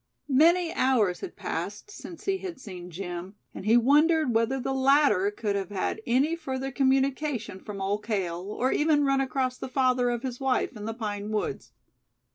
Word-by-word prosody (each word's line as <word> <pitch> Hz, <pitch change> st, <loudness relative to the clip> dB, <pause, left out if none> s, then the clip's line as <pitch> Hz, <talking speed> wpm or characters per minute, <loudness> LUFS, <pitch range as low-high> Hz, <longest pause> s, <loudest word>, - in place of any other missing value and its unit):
Many 330 Hz, +5 st, +4 dB
hours 225 Hz, -9 st, +2 dB
had 385 Hz, -, -7 dB
passed 415 Hz, -, -5 dB
since 350 Hz, -4 st, -10 dB
he 390 Hz, -1 st, 0 dB
had 365 Hz, -7 st, -7 dB
seen 180 Hz, -7 st, -9 dB
Jim, 180 Hz, +2 st, -6 dB, 0.2 s
and 195 Hz, -, -7 dB
he 230 Hz, +2 st, +6 dB
wondered 295 Hz, +2 st, +4 dB
whether 230 Hz, +4 st, +1 dB
the 270 Hz, +1 st, -2 dB
latter 265 Hz, -7 st, +4 dB
could 210 Hz, -1 st, -2 dB
have 195 Hz, -2 st, -2 dB
had 205 Hz, +2 st, -2 dB
any 270 Hz, +7 st, +2 dB
further 270 Hz, -4 st, -4 dB
communication 270 Hz, -5 st, 0 dB
from 205 Hz, 0 st, -8 dB
Old 200 Hz, +2 st, -1 dB
Cale, 190 Hz, -6 st, -2 dB
or 250 Hz, +5 st, 0 dB
even 295 Hz, -1 st, +3 dB
run 275 Hz, 0 st, +2 dB
across 260 Hz, -1 st, -1 dB
the -, -, -5 dB
father 255 Hz, -1 st, +2 dB
of 240 Hz, 0 st, -2 dB
his 250 Hz, -2 st, -4 dB
wife 265 Hz, -2 st, 0 dB
in 210 Hz, -1 st, -7 dB
the 225 Hz, 0 st, -4 dB
pine 210 Hz, -2 st, -4 dB
woods. 215 Hz, -1 st, -3 dB
255 Hz, 180 wpm, -27 LUFS, 210-275 Hz, 0.2 s, he